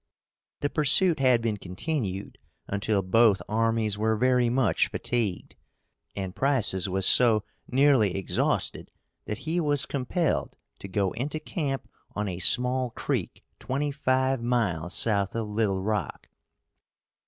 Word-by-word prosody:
The 145 - 0
pursuit 160 +3 +4
had 125 -3 +3
been 110 -3 -1
continued 95 - -4 0.3
until 100 0 -1
both 105 +1 +4
armies 110 -1 0
were 110 +1 +1
very 125 +1 +2
much 125 -4 +1
fatigued, 115 -7 -3 0.6
and 95 -2 -5
Price's 115 -9 +1
was 95 +1 -1
so 115 -3 +4 0.2
nearly 130 -7 +3
exhausted 95 -2 -1 0.4
that 105 - -4
he 165 +3 0
was 145 -4 +1
compelled 140 +4 -2 0.2
to - - -8
go 95 -1 -1
into 145 +6 -4
camp 145 -4 -4 0.3
on 105 0 -2
a 90 -2 -5
small 125 +5 +4
creek - - -4 0.2
twenty 145 +3 -2
five 130 -2 0
miles 100 -9 -1
south 100 -3 +1
of 115 -2 -2
Little 105 -3 -1
Rock. 105 -4 -3
115 Hz, 130 wpm, -26 LUFS, 100-135 Hz, 0.6 s, pursuit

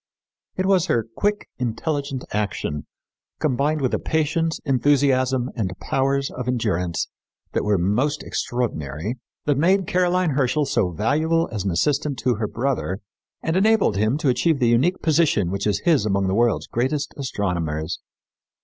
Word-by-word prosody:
'" - - -60
It 185 - 0
was 190 -2 +3
her 115 - +1
quick, 205 0 0
intelligent 135 +2 -2
action, 100 -8 -2 0.5
combined 150 +2 +1
with 130 - 0
a - - +1
patience, 160 +1 0
enthusiasm 130 -2 +2
and 95 -6 -2
powers 135 0 0
of 125 -1 -6
endurance 95 -9 0 0.4
that - - 0
were 105 -1 +2
most 120 - 0
extraordinary, 105 - -3 0.3
that 145 -2 +2
made 190 +4 +3
Caroline 180 -1 +2
Herschel 140 +2 +1
so 110 -8 +1
valuable 155 - +1
as 105 -4 -3
an - - +1
assistant 140 - 0
to 125 +2 +1
her 110 -1 -1
brother, 120 -7 -1 0.5
and 160 - 0
enabled 210 - +3
him 110 +7 +1
to 155 -3 +1
achieve 155 +5 +2
the 120 -3 +2
unique 135 +11 +2
position 150 - +2
which 100 +1 -1
is 100 -1 0
his 160 -10 +3
among 100 -2 +1
the 95 - 0
world's 115 +1 +2
greatest 135 +4 -1
astronomers. 85 - -2
130 Hz, 155 wpm, -23 LUFS, 105-150 Hz, 0.5 s, was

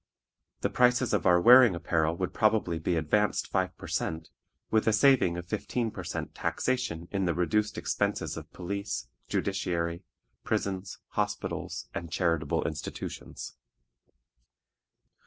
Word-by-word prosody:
The - - 0
prices 125 -1 +3
of 100 -5 +2
our 90 0 +6
wearing 120 0 +8
apparel 80 -1 0
would 90 0 -2
probably 105 -6 +2
be 85 +2 0
advanced 95 +7 +1
five 95 -1 -1
per - - -10
cent., 80 0 -2 0.4
with 110 0 +2
a 110 - +4
saving 115 -7 +4
of 85 - -5
fifteen 110 +4 -2
per 95 - -7
cent. 85 - -5
taxation 105 -10 -2
in 95 -2 0
the 85 -3 0
reduced 105 +5 +1
expenses - - -1
of - - -9
police, 100 -7 -4 0.2
judiciary, 85 0 -1 0.4
prisons, 95 -1 -2
hospitals, - - -3
and 85 -2 -5
charitable 80 -5 0
institutions. - - -6
90 Hz, 130 wpm, -29 LUFS, 85-110 Hz, 0.4 s, wearing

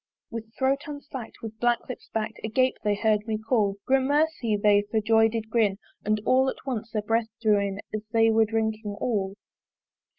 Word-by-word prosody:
With 225 -1 -7
throat 270 +1 +2
unslack'd, 285 -5 -7
with 220 -1 -7
black 240 0 +1
lips 255 - -8
bak'd 220 0 -3
Agape 255 +4 +2
they 210 -1 +2
hear'd 215 0 +1
me 220 -1 0
call: 220 -3 +1
Gramercy! 270 -3 +2
they 205 0 +4
for 220 - +1
joy 225 +1 +4
did 225 -1 -4
grin 215 -4 +2 0.3
And 215 +1 +1
all 260 +1 +4
at - - -8
once 235 -4 -3
their 215 -1 -2
breath 225 +1 +1
drew 215 -3 +3
in 200 0 -2
As 215 - -2
they 225 -1 +4
were 220 0 +4
drinking 220 -1 -2
all. 200 -5 -1
225 Hz, 185 wpm, -26 LUFS, 215-240 Hz, 0.3 s, they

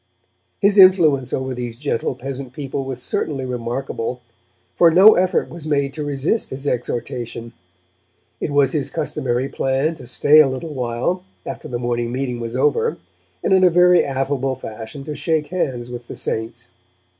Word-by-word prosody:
His 200 0 +3
influence 160 -9 +6
over 130 0 -2
these 120 -2 -5
gentle 130 -2 -2
peasant 130 0 -6
people 135 -1 -4
was 130 -2 -5
certainly 135 0 -2
remarkable, 125 0 -4 0.5
for 170 - +6
no 190 +6 +8
effort 185 0 +1
was 165 -2 -9
made 140 -2 0
to 155 - -4
resist 145 - -1
his 135 +2 -7
exhortation. 120 -2 -3 0.9
It - - -2
was 145 -2 +3
his 150 -4 -1
customary 130 -5 -2
plan 135 +4 0
to 125 - -11
stay 145 +5 +5
a 155 - +7
little 140 +4 -5
while, 125 +8 -2 0.2
after - - -6
the 120 - -3
morning 120 -1 -2
meeting 125 -1 -3
was 115 0 -5
over, 135 -2 +1 0.5
and - - +2
in 190 0 +5
a 180 - +7
very 180 +1 +5
affable 135 -1 -1
fashion 115 +3 -8
to 150 +1 -5
shake 155 -1 -1
hands 125 -9 -2
with 120 -1 -8
the - - -7
Saints. 115 +1 -4
135 Hz, 165 wpm, -20 LUFS, 125-150 Hz, 0.9 s, no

